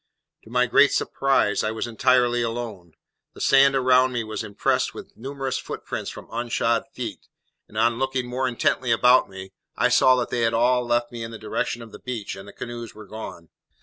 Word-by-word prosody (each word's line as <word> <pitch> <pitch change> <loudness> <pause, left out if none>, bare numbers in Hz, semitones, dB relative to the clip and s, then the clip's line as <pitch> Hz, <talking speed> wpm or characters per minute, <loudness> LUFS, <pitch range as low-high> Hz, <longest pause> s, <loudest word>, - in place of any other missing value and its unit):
To - - -14
my 125 +1 +2
great 140 +3 +5
surprise, 135 -7 +1
I 110 - 0
was 110 0 -3
entirely 120 +1 +2
alone. 115 -8 -5 0.4
The - - -12
sand 135 0 +5
around 130 0 +4
me 120 -2 -1
was 110 +1 -5
impressed 100 -2 0
with - - -10
numerous 135 +2 -4
footprints - - -5
from - - -9
unshod 115 -1 0
feet; 115 -6 -7 0.4
and, 110 - -12
on 115 +1 +2
looking 135 -1 -1
more 130 +2 -1
intently 125 0 0
about 125 +2 +5
me, 95 0 -9 0.2
I - - +2
saw 130 - +5
that 125 -1 -2
they 120 - 0
had 115 0 +2
all 125 +2 +3
left 120 0 +1
me 120 -1 -7
in 115 - -5
the 115 - -8
direction 110 +2 -3
of 115 - -13
the - - -11
beach, 120 -5 -5
and 95 +1 -11
the 100 - -11
canoes 120 -2 -7
were 110 0 -11
gone. 95 -5 -9
120 Hz, 200 wpm, -24 LUFS, 110-125 Hz, 0.4 s, great